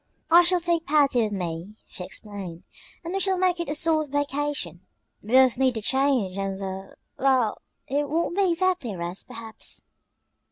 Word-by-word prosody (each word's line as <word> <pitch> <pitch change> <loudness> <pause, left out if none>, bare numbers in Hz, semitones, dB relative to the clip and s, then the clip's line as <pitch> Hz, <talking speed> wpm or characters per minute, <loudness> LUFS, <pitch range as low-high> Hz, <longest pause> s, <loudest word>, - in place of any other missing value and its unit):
"I 340 +1 +9
shall 355 +1 +2
take 340 -1 0
Patty 280 -4 +4
with 215 -2 0
me," 180 +1 -4
she 180 - -8
explained, 190 -3 -8 0.4
"and 340 +2 -5
we 390 - 0
shall 385 0 +1
make 360 -1 +2
it 340 - -3
a 295 - -1
sort 310 -1 +3
of - - -20
vacation. 285 - -2 0.4
We 215 +4 -6
both 260 -1 +6
need 260 -2 +3
the 220 - -3
change 260 -8 +1
and 195 -1 -2
the 190 0 -6 0.2
well, 260 -5 +2 0.3
it 285 +1 -1
won't 335 +2 0
be 390 -2 +3
exactly 345 - +1
a - - -7
rest, 175 +2 -5
perhaps." 225 -1 -6
265 Hz, 185 wpm, -25 LUFS, 200-330 Hz, 0.4 s, I